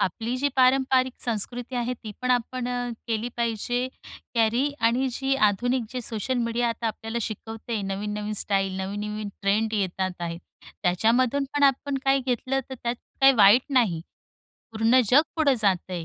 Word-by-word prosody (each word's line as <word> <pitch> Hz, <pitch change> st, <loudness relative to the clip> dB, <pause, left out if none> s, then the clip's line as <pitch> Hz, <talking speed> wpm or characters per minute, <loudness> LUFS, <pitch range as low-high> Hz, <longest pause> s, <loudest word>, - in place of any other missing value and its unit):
आपली 225 Hz, +6 st, -1 dB
जी 280 Hz, +3 st, +1 dB
पारंपारिक 260 Hz, 0 st, +3 dB
संस्कृती 240 Hz, +2 st, -2 dB
आहे 240 Hz, +1 st, -1 dB
ती 220 Hz, -3 st, -9 dB
पण 255 Hz, -, 0 dB
आपण 245 Hz, 0 st, 0 dB
अ, 245 Hz, 0 st, -2 dB, 0.2 s
केली 225 Hz, +1 st, -1 dB
पाहिजे 240 Hz, +2 st, -1 dB, 0.5 s
कॅरी 235 Hz, +5 st, +2 dB
आणि 240 Hz, +4 st, +2 dB
जी 270 Hz, +2 st, 0 dB
आधुनिक 245 Hz, +5 st, 0 dB
जे 255 Hz, -, -4 dB
सोशल 240 Hz, +2 st, -3 dB
मीडिया 235 Hz, 0 st, 0 dB
आता 230 Hz, 0 st, -3 dB
आपल्याला 225 Hz, +1 st, -3 dB
शिकवतयं 220 Hz, -1 st, -5 dB
नवीन-नवीन 210 Hz, +2 st, -3 dB
स्टाईल, 195 Hz, -2 st, 0 dB
नवीन-नवीन 210 Hz, +2 st, -4 dB
ट्रेंड 215 Hz, +3 st, +1 dB
येतात 190 Hz, -2 st, -1 dB
आहेत 170 Hz, 0 st, -4 dB, 0.4 s
त्याच्यामधून 235 Hz, +9 st, +2 dB
पण 290 Hz, -, +1 dB
आपण 275 Hz, 0 st, +2 dB
काही 270 Hz, 0 st, +3 dB
घेतलं 260 Hz, +2 st, 0 dB
तर -, -, -4 dB
त्यात 235 Hz, 0 st, -1 dB, 0.3 s
काही 270 Hz, 0 st, +8 dB
वाईट 210 Hz, +2 st, +7 dB
नाही. 225 Hz, -11 st, +2 dB, 0.7 s
पूर्ण 225 Hz, +3 st, +4 dB
जग 280 Hz, +4 st, +7 dB
पुढं 295 Hz, -4 st, +3 dB
जात 190 Hz, -3 st, +1 dB
आहे, 175 Hz, -2 st, -4 dB
235 Hz, 155 wpm, -25 LUFS, 210-255 Hz, 0.7 s, काही